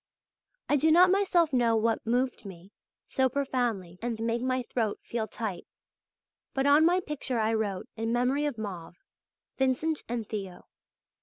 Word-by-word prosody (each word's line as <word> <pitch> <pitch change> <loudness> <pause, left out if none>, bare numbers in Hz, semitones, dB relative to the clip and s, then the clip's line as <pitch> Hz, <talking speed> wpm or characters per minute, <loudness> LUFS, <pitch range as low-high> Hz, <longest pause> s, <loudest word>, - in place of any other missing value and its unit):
I 290 - +3
do 315 +3 +3
not 360 +3 +7
myself 365 -6 +2
know 235 -2 +3
what 225 0 0
moved 250 +1 0
me 190 -1 -11 0.4
so 265 -1 +1
profoundly 240 -10 -2
and 230 -1 -3
made 230 +1 -1
my 255 0 0
throat 225 -3 -2
feel 225 -2 -3
tight, 210 -4 -5 0.9
but 270 0 +1
on 295 +3 +6
my 360 +2 +3
picture 290 -6 -3
I 220 0 +1
wrote: 205 -4 -2
"In 225 +1 -2
memory 250 +5 +1
of 285 - -4
Mauve. 185 -6 -6 0.6
Vincent 265 +4 +1
and 230 -3 -3
Theo." 195 -4 -6
240 Hz, 155 wpm, -28 LUFS, 220-280 Hz, 0.9 s, not